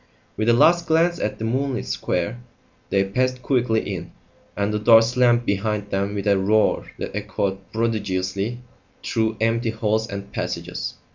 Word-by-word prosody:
With 110 +2 0
a - - +6
last 170 +8 +4
glance 170 +2 +2
at 105 - -2
the 110 - -4
moonlit 130 +2 -1
square, 100 +8 -2 0.5
they 100 0 +2
passed 130 +5 -1
quickly 120 -4 +1
in, - - -6 0.5
and 100 +1 0
the 105 - 0
door 115 +1 +7
slammed 120 0 +3
behind 105 0 -1
them 100 +1 -1
with 100 - -3
a 100 -2 +3
roar 105 +3 +2
that - - -5
echoed 100 -2 -2
prodigiously 105 -1 -1 0.5
through 110 -1 0
empty 115 +1 +1
halls 110 0 0
and 100 -2 -7
passages. - - -4
110 Hz, 155 wpm, -23 LUFS, 100-120 Hz, 0.5 s, door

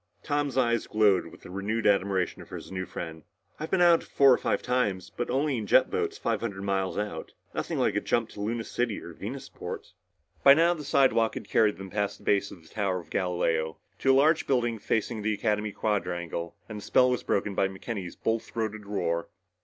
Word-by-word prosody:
Tom's 145 -2 -1
eyes 120 -3 +2
glowed 105 -3 +3
with - - -15
renewed 100 +5 -3
admiration 100 -2 +1
for - - -10
his - - -9
new 95 -1 -4
friend. 80 -3 -6 0.4
"I've 155 - -4
been 185 -2 +3
out 170 -1 +6
four 135 -2 +5
or - - +3
five - - 0
times 105 -8 0
but 120 - -3
only 135 +1 +1
in 105 - -5
jet - - +5
boats - - -1
five - - -1
hundred 100 -4 -4
miles 95 -1 -1
out. 105 0 -4 0.2
Nothing - - -2
like - - +1
a - - +1
jump 115 -1 0
to 100 - -9
Luna 115 +2 -2
City 120 -2 -2
or 85 - -10
Venusport." 120 +11 -7 0.5
By 140 0 +9
now 170 +2 +4
the 155 -3 -7
slidewalk 130 -5 +3
had - - -6
carried 105 -2 +3
them 95 -1 -8
past 100 -1 -1
the - - -19
base 100 0 +2
of 85 - -13
the 80 - -18
Tower 100 -4 -1
of 80 -2 -14
Galileo 80 -4 0 0.2
to 135 - +4
a - - +5
large 155 +3 +3
building 120 -4 +1
facing 110 +2 -1
the 105 0 0
Academy 105 0 0
quadrangle 85 -5 -2
and 110 -2 -6
the - - -10
spell 125 0 +4
was 125 - 0
broken 100 0 0
by 95 - +2
McKenny's 95 -1 -6
bull 115 0 0
throated 110 -2 -5
roar. 85 -5 -1
105 Hz, 210 wpm, -28 LUFS, 95-120 Hz, 0.5 s, By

